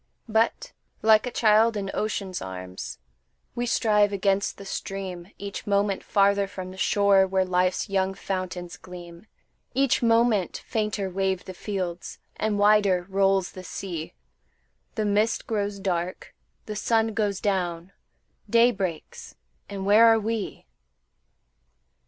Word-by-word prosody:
But, 230 - +1 0.3
like 220 +2 +5
a - - -3
child 220 0 +4
in 195 -1 -3
ocean's 200 -3 -3
arms, 95 -1 -7 0.6
We 240 0 -2
strive 210 -3 +3
against 200 0 0
the 200 - -10
stream, 190 -3 -5
Each 200 +2 -7
moment 200 -1 +1
farther 200 0 +2
from 185 -2 -7
the 190 - -11
shore 195 +1 +4
Where 190 0 +1
life's 180 +2 +1
young 195 -1 0
fountains 185 -3 -4
gleam; 175 +1 -11 0.5
Each 270 -1 +2
moment 230 -4 +2
fainter 210 -2 -1
wave 190 0 -1
the 185 - -7
fields, 180 -3 -5 0.2
And 215 -1 -1
wider 205 -3 +4
rolls 195 -1 +2
the 185 - -10
sea; 170 -4 -6 0.8
The 215 - -1
mist 210 +2 +1
grows 205 -2 -2
dark, 185 -2 -3 0.3
the 215 - -5
sun 225 +1 +1
goes 205 -2 -1
down, 180 -3 -2 0.6
Day 235 +3 +5
breaks, 195 - -5 0.3
and 195 -1 -5
where 215 +3 +7
are 225 0 +5
we? 220 -1 -4
200 Hz, 130 wpm, -25 LUFS, 185-215 Hz, 0.8 s, where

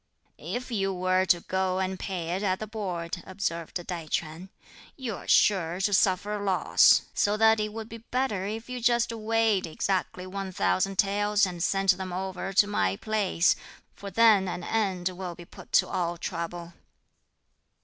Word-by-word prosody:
"If 245 - -5
you 195 -3 0
were 185 0 +1
to 175 -1 +3
go 190 0 -1
and 190 0 -2
pay 175 -4 -4
it 190 - -3
at 190 -2 +1
the 215 - -5
Board," 180 -6 -4
observed 170 -4 -4
Tai 170 -3 -5
Ch'üan; 160 +4 -3 0.5
"you 245 -6 -4
are - - -11
sure 180 -4 +3
to 205 +1 +1
suffer 200 +2 +2
loss; 195 -2 +4
so 205 +1 +1
that 220 0 +5
it 210 0 -2
would 220 0 -7
be 230 0 -9
better 230 -5 -2
if 220 +2 -5
you 250 -1 -5
just 235 0 +2
weighed 225 -3 +1
exactly 185 +2 -2
one 195 0 -5
thousand 190 +1 0
taels 205 +1 +2
and 175 -2 -6
sent 195 -1 +3
them 190 -1 -5
over 190 +1 -4
to 195 +2 +5
my 95 - 0
place; 200 - +1 0.4
for 200 - -8
then 210 -1 +5
an 175 -1 -4
end 190 -4 0
will 180 -1 -6
be 175 - -11
put - - -14
to - - +5
all 175 -1 -2
trouble." 170 0 -5
190 Hz, 170 wpm, -27 LUFS, 180-210 Hz, 0.5 s, that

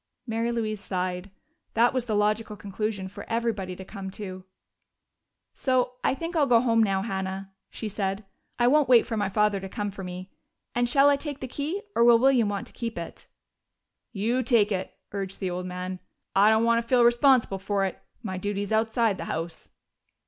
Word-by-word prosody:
Mary 230 0 -1
Louise 215 -3 -2
sighed: 180 0 -3 0.5
that 235 +3 +4
was 255 -2 -1
the 215 - 0
logical 210 +1 +1
conclusion 205 -1 -3
for 200 +2 -9
everybody 225 -5 -1
to 190 - -9
come 195 -1 -7
to. 190 -1 -7 1.1
"So 255 -1 +1
I - - +2
think 335 +4 -5
I'll 295 -3 +3
go 240 -2 +6
home 230 -2 +3
now, 195 -3 +2
Hannah," 190 -1 -4 0.2
she 220 - -5
said. 195 0 -3 0.3
"I 240 - +3
won't 290 +1 +4
wait 240 -3 +7
for 230 - -3
my 205 -2 0
father 210 0 +2
to 195 0 -7
come 205 0 -3
for 195 0 -8
me. 180 +1 -7 0.4
And 240 0 +1
shall 275 +3 +5
I 285 - +3
take 285 -1 -6
the 260 - -5
key, 305 - -3
or 235 - +4
will 235 -1 +7
William 250 -3 +4
want 200 -1 -3
to - - -16
keep 230 -4 -5
it?" 170 -1 -7 0.8
"You 230 +4 0
take 225 -4 +3
it," 190 -1 -2 0.2
urged 195 -1 -4
the 185 -2 -2
old 180 +1 -4
man. 180 0 -5 0.4
"I 200 +2 +6
don't 220 +1 +4
want 230 0 +3
to 230 - -15
feel 245 -1 +4
responsible 240 -4 +4
for 195 0 0
it. 190 - -5 0.2
My 185 -1 -4
duty's 205 +1 -3
outside 220 -1 +2
the - - -4
house." 165 +1 -5
215 Hz, 195 wpm, -26 LUFS, 195-235 Hz, 1.1 s, wait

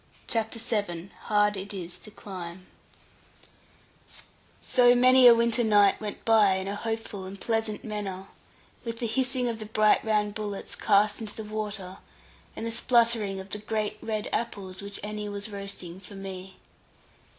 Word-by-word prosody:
CHAPTER 225 0 -1
VII 205 -6 -3
HARD 210 -1 +3
IT 200 +2 -6
IS 180 -1 -6
TO - - -12
CLIMB 185 -3 -8 1.9
So 245 -1 +5
many 255 +1 +7
a 235 - +10
winter 235 +1 +2
night 205 -2 +4
went 210 -1 -6
by 215 -4 +5
in 190 0 -3
a 200 - -2
hopeful 225 -2 -4
and 195 +1 -8
pleasant 225 -1 -1
manner, 200 -3 -4 0.6
with 230 -1 -4
the 235 - -2
hissing 250 +2 0
of 230 -2 -3
the 215 - -6
bright 215 0 +3
round 210 -2 +1
bullets, 205 -2 -4
cast 205 +1 +3
into 215 -2 -6
the 220 - -5
water, 210 -3 -4 0.6
and - - -5
the 230 - -2
spluttering 230 -4 +2
of 190 +1 -10
the 210 - -3
great 215 0 -2
red 215 -2 -2
apples 195 -5 -3
which 200 0 -6
Annie 210 0 -4
was 205 +1 -4
roasting 195 -3 -6
for 200 +1 -12
me. 190 -1 -8
210 Hz, 160 wpm, -27 LUFS, 195-225 Hz, 1.9 s, a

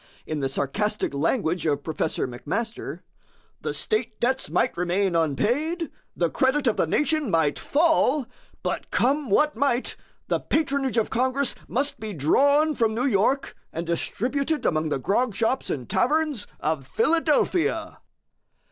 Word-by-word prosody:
In 155 -1 -3
the 135 -1 -1
sarcastic 210 +9 -1
language 165 - 0
of 145 -1 0
Professor 160 -2 -1
McMaster, 165 - -4 0.6
"The - - -2
state 335 - -2
debts 260 +2 0
might 250 - +1
remain 180 +1 0
unpaid, 250 - 0 0.2
the 170 - +2
credit 270 +2 +1
of 230 - +3
the - - +1
nation 300 - +1
might 160 -5 +2
fall, 305 -3 +2 0.4
but - - -3
come 280 +1 +1
what 300 +9 +3
might, 265 -3 0 0.3
the - - +1
patronage 280 -5 0
of 225 - +1
Congress 260 +3 +1
must 280 +4 -1
be 215 -1 -5
drawn 285 - +3
from 225 -5 +1
New 245 +3 0
York 260 +3 +1 0.2
and 165 +1 -4
distributed 265 - -1
among 155 -1 +1
the - - 0
grog 205 - 0
shops 235 +4 0
and 125 -5 -3
taverns 295 -4 +1
of 150 -4 -2
Philadelphia." 330 -3 +1
235 Hz, 140 wpm, -25 LUFS, -, 0.6 s, of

